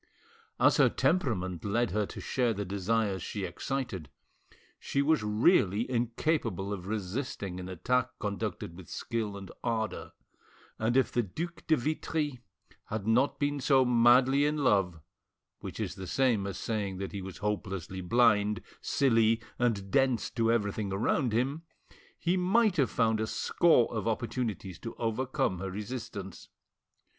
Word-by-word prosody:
As - - +5
her - - +6
temperament 95 - 0
led 115 +2 0
her 105 +1 0
to - - -8
share 120 -4 0
the 100 +1 -3
desires 100 0 0
she 100 +3 -4
excited, 95 - -4 0.7
she 140 - 0
was 155 -3 +3
really 105 - +3
incapable 120 - -1
of 95 -2 -6
resisting 100 -2 -3
an 90 0 -6
attack 125 +8 0
conducted 100 -4 -4
with 90 -1 -12
skill 110 -4 -3
and 95 -1 -9
ardour, 115 -2 -2 0.7
and 115 +3 +1
if 130 - +3
the 120 - +2
Duc 160 - -6
de 160 -2 +4
Vitry 150 0 -2 0.5
had 110 -2 -4
not 120 +5 +2
been 145 0 0
so 135 -1 +4
madly 125 +3 +5
in 150 +1 +1
love, 95 -8 +2 0.6
which - - -7
is - - -2
the 95 -1 -8
same 115 -4 +2
as 100 - -5
saying 100 -4 -2
that 95 0 -4
he 100 - -5
was 95 0 -8
hopelessly 95 -3 -3
blind, 105 +1 +3 0.2
silly, 115 -4 +3 0.2
and 105 -6 0
dense 130 -3 +2
to 115 -1 +1
everything 105 -3 -1
around 115 +6 +1
him, 130 +7 0 0.6
he 175 +2 +1
might 190 +2 +3
have 135 -4 +3
found 110 -2 +1
a 110 - -1
score 160 -4 +3
of 110 0 -2
opportunities 110 -5 -3
to 115 - -7
overcome 115 -5 -1
her 95 +1 -3
resistance. 100 -2 -6
115 Hz, 150 wpm, -30 LUFS, 100-130 Hz, 0.7 s, her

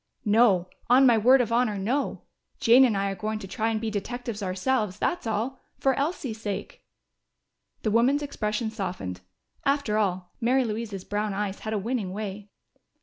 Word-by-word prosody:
"No. 205 -4 +4 0.2
On 260 +2 +7
my 240 -3 +6
word 250 +4 +5
of 230 -2 -2
honor, 230 -3 +2
no! 240 +9 -1 0.4
Jane 250 +3 +7
and 220 -5 +1
I 195 0 0
are - - -4
going 215 +3 -3
to 195 - -8
try 220 +4 -1
to 220 - 0
be 220 0 -3
detectives 230 +1 -4
ourselves, 200 +2 -1
that's 345 +1 -1
all. 225 +5 -2 0.2
For 270 - +2
Elsie's 275 -6 -2
sake." 205 -3 -5 1.0
The 215 - +1
woman's 255 +6 +3
expression 220 -5 -2
softened. 180 - -5 0.4
After 275 -7 +1
all, 180 -3 -1
Mary 255 +2 +3
Louise's 215 -3 -4
brown 205 -1 -2
eyes 200 -1 -3
had 220 - -4
a - - +1
winning 210 -2 -2
way. 205 0 -6
220 Hz, 170 wpm, -26 LUFS, 200-245 Hz, 1.0 s, On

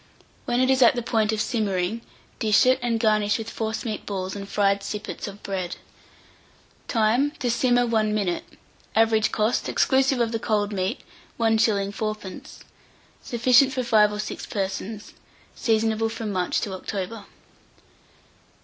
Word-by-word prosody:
When 240 - 0
it 255 +1 +3
is 265 0 +2
at 240 0 +6
the 240 - -2
point 220 -2 +1
of 220 - -2
simmering, 210 -2 -1 0.4
dish 215 +1 +4
it, 255 +1 +4
and 235 -2 0
garnish 215 -2 +2
with 225 0 -6
forcemeat 220 -1 -3
balls 190 -1 -3
and 200 0 -7
fried 200 -1 +2
sippets 210 +2 -5
of 200 0 -10
bread. 185 -3 -3 1.1
Time. 230 +5 +2
To 245 -2 -1
simmer 245 0 +2
1 220 -2 +1
minute. 200 -5 -1 0.5
Average 220 -1 +3
cost, 215 +2 0
exclusive 265 -1 +2
of 230 -1 +1
the 225 - -2
cold 210 -2 0
meat, 185 -1 -2 0.4
1s. 220 -3 +2
4d. 215 -3 -6 0.6
Sufficient 250 +3 +4
for 255 - -1
5 210 -3 +4
or 210 - -5
6 215 - -5
persons. 200 +1 -4 0.4
Seasonable 225 -1 +1
from 220 -1 -4
March 180 -2 0
to 200 - -3
October. 200 +3 -5
220 Hz, 145 wpm, -24 LUFS, 205-230 Hz, 1.1 s, at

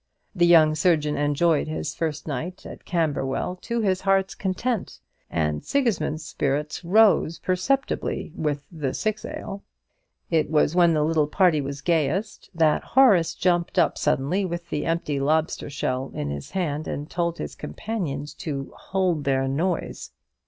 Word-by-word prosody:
The 175 -3 +3
young 160 -3 +6
surgeon 150 -2 +2
enjoyed 145 +2 +2
his 155 -1 -3
first 160 -1 -3
night 160 +6 -5
at - - -10
Camberwell 160 0 -1
to 235 +5 -2
his 190 -3 +1
heart's 195 -1 +2
content; 210 +3 -2 0.3
and 75 -2 -1
Sigismund's 225 - 0
spirits 145 +4 -2
rose 195 -3 +4
perceptibly 185 - -1
with 145 -2 -2
the 150 -6 -3
six 215 0 -2
ale. 200 +1 -6 0.7
It 160 -3 +2
was 155 +1 +2
when 170 -2 +5
the 150 - +2
little 155 -1 +2
party 170 -2 +3
was 140 0 -5
gayest 170 +6 -1
that 160 -2 +3
Horace 215 -11 +4
jumped 175 0 0
up 175 - +3
suddenly 150 +10 0
with 170 -2 -4
the 150 - -2
empty 165 -4 -1
lobster 155 +2 0
shell 130 -1 -2
in 70 -1 -3
his 70 0 -6
hand, 155 -5 -2
and 145 +1 -4
told 170 0 -2
his - - -5
companions 155 -10 -4
to 140 -4 -4
"hold 185 -5 -1
their 135 -1 +1
noise." 165 +6 -2
160 Hz, 150 wpm, -24 LUFS, 145-185 Hz, 0.7 s, young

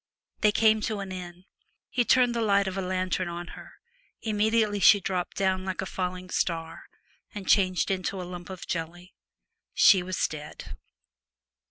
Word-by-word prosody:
They 210 - +4
came 220 0 +3
to 215 -1 -2
an 195 -1 -6
inn. 180 -1 -8 0.5
He 245 - +2
turned 245 0 +4
the 235 - -1
light 200 -2 +2
of 190 - -3
a 195 - -2
lantern 185 0 -1
on 170 0 -6
her; - - -12 0.5
immediately 215 -1 +1
she 205 +1 +7
dropped 180 -1 -3
down 190 -1 +1
like 190 -1 -4
a 195 - -2
falling 185 0 -4
star, 165 -1 -2 0.5
and 200 -2 -7
changed 185 -2 +3
into 190 0 -2
a - - -4
lump 175 0 -8
of 185 -2 -8
jelly. 175 +2 -5 0.6
She 190 -4 +6
was 185 0 -4
dead. 150 -1 -9
185 Hz, 165 wpm, -27 LUFS, 180-205 Hz, 0.6 s, she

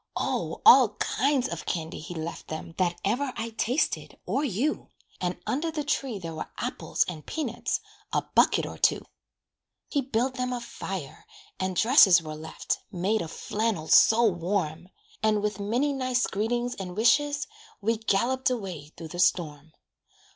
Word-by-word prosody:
Oh! - - -2
all 240 -6 +8
kinds 270 +2 +1
of 170 -1 -6
candy 160 -2 -3
he 175 +3 -8
left 160 +1 -6
them 155 +1 -6
That 175 -2 +1
ever 255 +7 0
I 230 - -3
tasted, 240 +6 -1
or 280 - 0
you; 275 +4 -1 0.3
And 180 0 -2
under 310 +6 -1
the 310 -2 -3
tree 270 -5 -1
there 165 -4 -6
were 155 - -6
apples - - -1
And 160 -4 -6
peanuts 315 -2 -2 0.3
a - - +1
bucket - - +4
or - - -8
two. - - +2 0.8
He 285 - +1
built 255 0 -1
them 250 0 -1
a 245 - -2
fire, 190 - -7 0.3
and 185 0 -1
dresses 205 -4 +7
Were 155 -2 -7
left, 155 +1 -4
made 200 +4 0
of 165 - -5
flannel 210 -7 -2
so 230 +2 +6
warm; 175 -3 -1 0.3
And, 215 -1 +2
with 210 -2 -1
many 240 +8 0
nice 255 -2 +1
greetings 240 +4 -1
and 185 -1 -7
wishes, 285 +6 +3 0.3
We 225 +2 0
galloped 235 +5 +1
away 185 - -5
through 165 -1 -8
the 175 - -7
storm. 160 -4 +1
210 Hz, 160 wpm, -27 LUFS, 175-250 Hz, 0.8 s, all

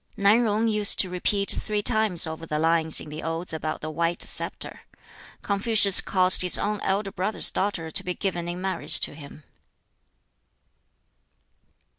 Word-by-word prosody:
Nan 210 +4 +2
Yung 220 +1 -1
used 210 -2 +3
to 185 - -6
repeat 200 +2 -1
three 210 -1 -2
times 215 -7 +2
over 160 0 -8
the 150 - -4
lines 160 0 +2
in - - -9
the 155 +1 -8
Odes 165 +1 -5
about 155 0 -5
the 155 - -6
white 170 +2 -3
sceptre. - - -2 0.6
Confucius 200 -1 +4
caused 185 -1 +4
his 180 -1 +5
own 210 0 -3
elder 195 +1 -3
brother's 190 +4 -1
daughter 180 -5 -4
to 185 - 0
be 180 -1 -5
given 175 -3 -4
in 175 +1 -6
marriage 190 0 0
to - - +2
him. 145 0 -14
185 Hz, 155 wpm, -23 LUFS, 165-205 Hz, 0.6 s, his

